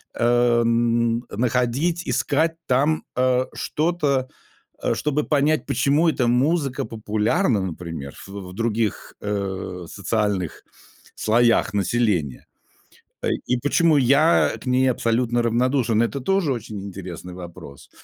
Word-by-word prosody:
э, 120 0 +3
н 115 0 +1
находить, 125 +9 0
искать 160 +3 +1
там, 145 +5 +2
э, 130 0 +2
что-то, 150 -5 0 0.6
э, - - +2
чтобы 150 0 0
понять, 150 +1 +1
почему 150 +4 +2
эта 125 -6 0
музыка 135 +3 +1
популярна, 110 - 0
например, 85 -6 -6
в - - -15 0.2
в - - -11
других, 115 0 -2
э, 95 -3 -4
социальных 100 -3 -2 0.5
слоях 115 0 +2
населения. 100 - 0 0.8
Ай - - +1
и 125 - +2
почему 150 +4 +3
я 140 +5 +4
к - - -12
ней 130 +1 +3
абсолютно 120 0 0
равнодушен, 120 -1 +1
это 140 +4 -2
тоже 185 -2 +1
очень 110 -4 -6
интересный 90 -2 -8
вопрос. 85 -6 -11
120 Hz, 115 wpm, -22 LUFS, 105-140 Hz, 0.8 s, я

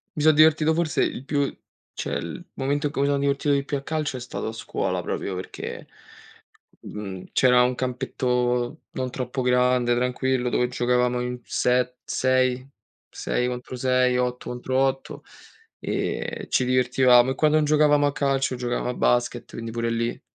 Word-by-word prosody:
Mi 150 - -2
so 155 - +7
divertito 155 +1 +5
forse 165 -2 +1
il 130 - -3
più 145 -1 -1 0.4
cioè - - -5
il - - -6
momento 145 +2 0
in - - -6
cui 140 - -2
mi 140 - +2
sono 140 -1 +1
divertito 140 +1 +1
di 140 - +1
più 140 +1 -2
a 135 - -8
calcio 150 -3 -2
è - - -6
stato 125 0 -5
a 110 - -2
scuola 110 - -2
proprio 95 - -3
perché, 95 - -7 0.9
mhmm, 95 -3 -7
c'era 125 -1 +5
un 125 0 +1
campetto 125 -1 -1
non 130 -1 -3
troppo 130 +1 -3
grande, 125 -1 +3
tranquillo, 125 +1 0
dove 125 - +1
giocavamo 125 0 +1
in 125 0 -4
set 125 0 +1
sei, 130 0 +1 0.4
6 125 - -2
contro 125 +1 -5
6, 125 0 +2
8 125 0 -2
contro 125 +1 -3
8 135 0 -1 0.6
e - - -3
ci 130 - +2
divertivamo. 125 0 +4
E - - -7
quando 155 +1 +3
non 155 - +2
giocavamo 150 -1 +4
a 145 - +1
calcio 135 -2 0
giocavamo 120 0 -2
a 125 - -2
basket, 120 0 0
quindi 115 0 -6
pure 115 0 -2
lì 115 +1 -2
125 Hz, 170 wpm, -24 LUFS, 125-140 Hz, 0.9 s, so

